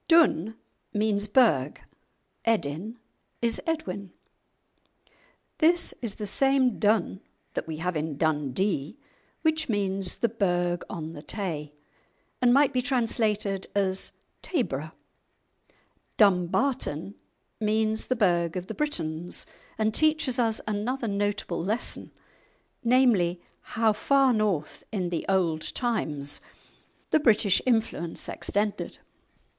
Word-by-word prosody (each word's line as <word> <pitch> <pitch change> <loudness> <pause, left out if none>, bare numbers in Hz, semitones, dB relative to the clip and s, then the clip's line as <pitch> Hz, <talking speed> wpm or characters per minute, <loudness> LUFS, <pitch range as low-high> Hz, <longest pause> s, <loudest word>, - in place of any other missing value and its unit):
"Dun" 295 - +4 0.4
means 210 -1 +1
burgh, 205 - +3 0.6
"Edin" 215 0 -1 0.4
is 235 -1 0
Edwin. 200 - -3 1.5
This 340 +2 +4
is 230 -5 -3
the 210 - -5
same 265 +2 +3
Dun 205 -3 +2 0.3
that - - -3
we 160 -1 -4
have 180 +2 -2
in 155 -2 -2
"Dundee," 150 - 0 0.5
which 315 -2 +1
means 195 -3 -1
the 235 - +1
burgh 175 -5 0
on 165 -4 -5
the 145 - -8
Tay, 155 -6 -4 0.7
and 245 -1 +5
might 280 +2 +5
be 250 - +2
translated 220 -6 0
as 190 -1 0 0.3
"Tayburgh." 160 - -2 1.3
"Dumbarton" 195 - +2 0.5
means 220 0 +1
the 255 - +1
burgh 175 -6 +2
of 180 - -4
the - - -6
Britons, 175 - -3 0.3
and 220 0 +1
teaches 310 -4 +2
us 225 -2 +1
another 230 +4 -1
notable 200 -4 -1
lesson, 215 +6 -3 0.7
namely, 230 -8 +3 0.4
how 225 -1 +4
far 270 +4 +3
north 205 -9 -1
in 185 -5 -1
the 170 -2 -3
old 170 -5 0
times 150 - -1 0.7
the 315 - +5
British 215 -7 +4
influence 220 -8 0
extended. 205 0 -2
205 Hz, 110 wpm, -27 LUFS, 175-240 Hz, 1.5 s, and